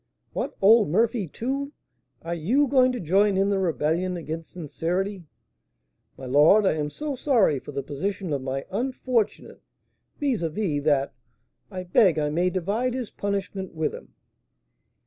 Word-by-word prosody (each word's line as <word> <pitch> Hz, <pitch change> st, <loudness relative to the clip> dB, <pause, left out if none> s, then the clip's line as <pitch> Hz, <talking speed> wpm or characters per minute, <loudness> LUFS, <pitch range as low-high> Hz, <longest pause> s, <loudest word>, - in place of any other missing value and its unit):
"What! -, -, -4 dB
old 215 Hz, -2 st, +6 dB
Murphy, 220 Hz, +2 st, +1 dB
too? 275 Hz, -, -4 dB, 0.5 s
Are 170 Hz, +1 st, -3 dB
you 220 Hz, -, +2 dB
going 255 Hz, -1 st, +4 dB
to 250 Hz, -, -4 dB
join 195 Hz, +4 st, +2 dB
in 195 Hz, +1 st, +2 dB
the 195 Hz, -, +1 dB
rebellion 175 Hz, +1 st, 0 dB
against 165 Hz, 0 st, -6 dB
sincerity?" 180 Hz, +3 st, -3 dB, 0.9 s
"My 135 Hz, -, -9 dB
lord, 150 Hz, +11 st, +5 dB
I -, -, +3 dB
am 150 Hz, -1 st, -2 dB
so 295 Hz, -, -4 dB
sorry 235 Hz, -, +2 dB
for 145 Hz, -, -10 dB
the 140 Hz, -1 st, -4 dB
position 180 Hz, +5 st, -3 dB
of 140 Hz, -, -1 dB
my 135 Hz, +1 st, -4 dB
unfortunate 245 Hz, 0 st, -2 dB, 0.6 s
vis 270 Hz, -8 st, 0 dB
à 165 Hz, -, 0 dB
vis, 155 Hz, -6 st, -1 dB
that 140 Hz, -3 st, +2 dB, 0.6 s
I 185 Hz, -2 st, -6 dB
beg 180 Hz, -1 st, +4 dB
I 150 Hz, -1 st, 0 dB
may 175 Hz, +4 st, +1 dB
divide 205 Hz, +8 st, -1 dB
his 250 Hz, -4 st, -4 dB
punishment 195 Hz, -2 st, -4 dB
with 160 Hz, -1 st, -1 dB
him." -, -, -12 dB
190 Hz, 155 wpm, -25 LUFS, 160-225 Hz, 0.9 s, old